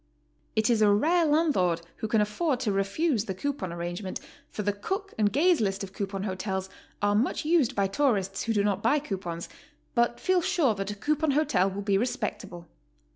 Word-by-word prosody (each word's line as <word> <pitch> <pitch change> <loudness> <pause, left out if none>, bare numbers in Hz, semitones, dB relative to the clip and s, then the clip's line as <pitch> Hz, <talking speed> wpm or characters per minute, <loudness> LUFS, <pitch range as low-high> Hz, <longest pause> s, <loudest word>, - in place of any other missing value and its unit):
It 220 -1 +2
is 225 -2 +2
a 210 - +6
rare 320 +11 +3
landlord 275 - +2
who 220 - -3
can 220 0 +2
afford 250 +6 0
to 225 -5 0
refuse 210 +5 0
the 190 - -4
coupon 240 -5 -3
arrangement, 175 +3 -4 0.3
for 210 - -5
the 205 0 +1
Cook 385 - -4
and 210 -2 +2
Gaze 335 - +3
list 195 -1 -1
of 190 -1 -8
coupon 195 -1 -4
hotels 190 -1 -3 0.3
are 205 0 +3
much 240 +8 0
used 315 -6 +3
by 200 - +2
tourists 195 -4 0
who 230 - 0
do 205 -2 +2
not 200 -1 0
buy 235 +8 +3
coupons, 185 - -4 0.5
but 235 0 +1
feel 370 -1 +2
sure 310 -8 +2
that 195 -1 -4
a 205 - -4
coupon 305 +8 0
hotel 195 -11 +2
will 200 +1 -5
be 195 -1 +2
respectable. 200 -7 -4
210 Hz, 190 wpm, -27 LUFS, 195-285 Hz, 0.5 s, a